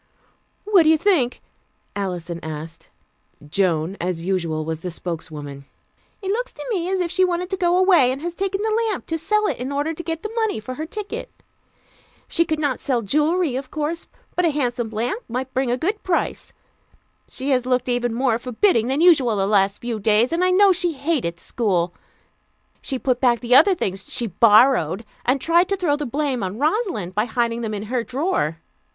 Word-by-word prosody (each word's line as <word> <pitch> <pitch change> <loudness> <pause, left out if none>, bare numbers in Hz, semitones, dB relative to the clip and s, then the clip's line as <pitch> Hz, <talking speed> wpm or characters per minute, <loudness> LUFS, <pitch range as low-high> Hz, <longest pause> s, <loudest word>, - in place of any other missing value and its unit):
"What 405 -3 +5
do 315 - +4
you 320 - +5
think?" 305 -10 +1 0.5
Alison 175 -4 -4
asked. 160 +1 -8 0.6
Joan, 175 +1 0
as 175 -1 -2
usual, 170 -4 -1
was 160 0 -4
the 180 - -4
spokeswoman. 150 -5 -7 0.6
"It 385 - -1
looks - - -2
to - - -9
me 360 -4 -1
as 380 -1 0
if 340 -2 -2
she 370 +1 +3
wanted 360 +1 -1
to - - +1
go 350 0 +2
away, 360 -9 +5
and 265 - -4
has 345 0 -3
taken 390 +2 -2
the 445 +1 +1
lamp 405 - -4
to 325 0 -3
sell 425 +5 +1
it 290 - -1
in 255 +3 -4
order 290 +3 -1
to 325 - -6
get 325 -1 -4
the 430 - -4
money 440 - 0
for 255 +4 -6
her 310 +4 -5
ticket. 420 +3 -6 1.0
She 335 - +1
could 315 -1 -1
not 290 -4 -1
sell 245 -4 -1
jewelry, 305 - +1
of 265 0 -4
course, 310 +2 -3 0.3
but 360 - +1
a 335 - +4
handsome 245 -6 -1
lamp 235 - -2
might 255 +2 -4
bring 260 0 0
a 245 - +1
good 405 - -2
price. 360 -2 -2 0.8
She 275 +2 -4
has 250 -1 +1
looked 250 -1 +1
even 245 -1 0
more 235 -1 +1
forbidding 245 - +2
than 270 +4 0
usual 285 -10 +5
the 195 -1 +1
last 200 -1 +2
few 235 -2 -3
days, 215 +6 +2
and 340 +2 +1
I 365 - +4
know 390 +2 +5
she 350 -2 0
hated 270 - -2
school. 180 -7 -1 0.9
She 265 - -2
put 250 -1 -1
back 240 -3 +3
the 245 0 0
other 380 +9 +7
things 195 - -4
she 240 - -1
'borrowed,' 215 - +4 0.2
and 260 +3 +3
tried 340 +5 +3
to 395 - 0
throw 340 -6 +1
the 295 -1 -4
blame 275 -1 -1
on 190 +2 -3
Rosalind 305 - -1
by 210 +3 +1
hiding 235 0 -1
them 215 -2 -3
in 205 - -4
her 240 +2 -2
drawer. 255 - -1
255 Hz, 200 wpm, -22 LUFS, 210-340 Hz, 1.0 s, other